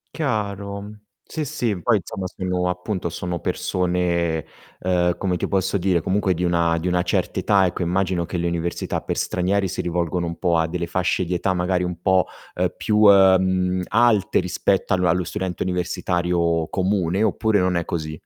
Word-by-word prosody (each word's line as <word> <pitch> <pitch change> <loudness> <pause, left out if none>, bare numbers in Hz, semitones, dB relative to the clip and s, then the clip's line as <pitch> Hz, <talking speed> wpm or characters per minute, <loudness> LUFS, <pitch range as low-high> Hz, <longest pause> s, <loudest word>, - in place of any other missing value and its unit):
Chiaro. 100 -7 -3 0.3
Sì, 155 - -4
sì, 110 -8 -2
poi 120 -3 +3
insomma, 95 -1 -5
sono 90 -1 -2
appunto 90 0 -3
sono 90 +1 -4
persone, 90 -3 -1 0.4
uhm, 90 -1 +1
come 90 -2 -1
ti - - -2
posso 95 0 0
dire, 90 -2 +1
comunque 95 0 +1
di 90 - -2
una 85 -1 +2
di 85 +3 -3
una 90 0 +2
certa 85 - -1
età, 100 -2 +3
ecco. 90 0 -2
Immagino 90 0 0
che 90 - -3
le 85 - -1
università 85 0 -2
per - - -4
stranieri 95 +2 0
si 95 - -3
rivolgano 85 0 -1
un 85 - -5
po' 85 -3 +1
a 80 0 +1
delle 85 0 -3
fasce 90 +1 0
di 90 - -3
età 95 +2 0
magari 90 +1 0
un 90 -1 -4
po', 95 0 +2 0.3
uhm, - - -1
più, 105 - 0
uhm, 95 -2 +5
alte 115 -3 +3
rispetto 95 +2 0
all 90 - +1
allo 90 +2 +2
studente 90 +1 -3
universitario 85 -2 0
comune, 95 +1 0
oppure 110 0 +2
non 90 0 +1
è 85 - 0
così? 75 -2 -4
90 Hz, 175 wpm, -22 LUFS, 85-95 Hz, 0.4 s, uhm